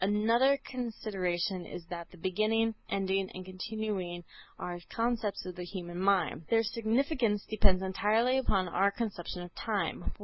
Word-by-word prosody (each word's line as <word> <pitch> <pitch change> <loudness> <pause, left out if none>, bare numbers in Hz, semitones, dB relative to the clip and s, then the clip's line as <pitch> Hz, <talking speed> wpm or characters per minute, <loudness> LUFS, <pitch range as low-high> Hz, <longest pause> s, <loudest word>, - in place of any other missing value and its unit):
Another 230 +7 +4
consideration 195 -7 -2
is 170 - -7
that 170 -1 -5
the 180 - -15
beginning, 215 +5 +2 0.2
ending 195 0 +1
and 185 0 -6
continuing 185 -2 -3 0.3
are 175 0 -4
conceptions 230 -3 -1
of 180 -1 -5
the 180 - -4
human 175 -1 -6
mind; 190 -4 +2
their 225 0 +4
significance 230 0 +1
depends 195 -3 +4
entirely 220 +7 +3
upon 195 -7 +1
our 190 +3 +3
conception 200 -5 -4
of 175 - -10
time. 205 -5 -2
200 Hz, 140 wpm, -32 LUFS, 185-225 Hz, 0.3 s, Another